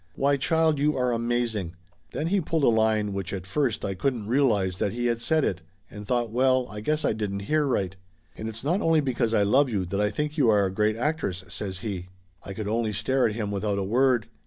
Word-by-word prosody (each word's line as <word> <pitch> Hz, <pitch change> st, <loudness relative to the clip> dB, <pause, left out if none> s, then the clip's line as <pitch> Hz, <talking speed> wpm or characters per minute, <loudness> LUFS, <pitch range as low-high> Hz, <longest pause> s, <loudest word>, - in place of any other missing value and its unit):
"Why, 140 Hz, +1 st, +2 dB
child, 160 Hz, +2 st, +2 dB
you 150 Hz, +1 st, +1 dB
are 125 Hz, -1 st, +1 dB
amaz 120 Hz, 0 st, 0 dB
ing!" 90 Hz, -4 st, -4 dB, 0.4 s
Then 150 Hz, -, -3 dB
he 190 Hz, +3 st, +1 dB
pulled 160 Hz, -1 st, -1 dB
a -, -, +6 dB
line 110 Hz, -2 st, +2 dB
which 95 Hz, -1 st, -4 dB
at 95 Hz, -2 st, -5 dB
first 120 Hz, +4 st, -1 dB
I 100 Hz, -, -2 dB
couldn't 120 Hz, +1 st, -2 dB
realize 105 Hz, -7 st, +1 dB
that 100 Hz, -, 0 dB
he 120 Hz, +1 st, -2 dB
had 115 Hz, -1 st, 0 dB
said 155 Hz, +5 st, +2 dB
it, 90 Hz, -2 st, -2 dB, 0.3 s
and 105 Hz, -1 st, -9 dB
thought 120 Hz, -2 st, 0 dB
well, 130 Hz, +1 st, +3 dB
I 105 Hz, 0 st, -6 dB
guess 150 Hz, +7 st, 0 dB
I -, -, +2 dB
didn't 100 Hz, -2 st, -3 dB
hear 150 Hz, +7 st, +1 dB
right. 95 Hz, -8 st, -1 dB, 0.4 s
"And 110 Hz, -, -5 dB
it's 110 Hz, +2 st, -7 dB
not 175 Hz, +8 st, +1 dB
only 165 Hz, -3 st, +3 dB
because 120 Hz, -4 st, 0 dB
I 105 Hz, -3 st, +3 dB
love 130 Hz, +7 st, +3 dB
you 100 Hz, -5 st, -1 dB
that 100 Hz, +3 st, -2 dB
I 105 Hz, -, +2 dB
think 150 Hz, +6 st, -3 dB
you 125 Hz, -5 st, +4 dB
are 105 Hz, -2 st, +4 dB
a 95 Hz, -, -1 dB
great 105 Hz, +2 st, +1 dB
actress," 120 Hz, -, -2 dB
says 95 Hz, -2 st, -5 dB
he. 95 Hz, -5 st, -4 dB, 0.4 s
I 95 Hz, -, -7 dB
could 110 Hz, 0 st, -4 dB
only 110 Hz, 0 st, 0 dB
stare 130 Hz, +5 st, +1 dB
at 105 Hz, -, -5 dB
him 105 Hz, -3 st, -3 dB
without 100 Hz, 0 st, -1 dB
a 100 Hz, -, -1 dB
word. 120 Hz, +2 st, +2 dB
115 Hz, 240 wpm, -26 LUFS, 100-135 Hz, 0.4 s, a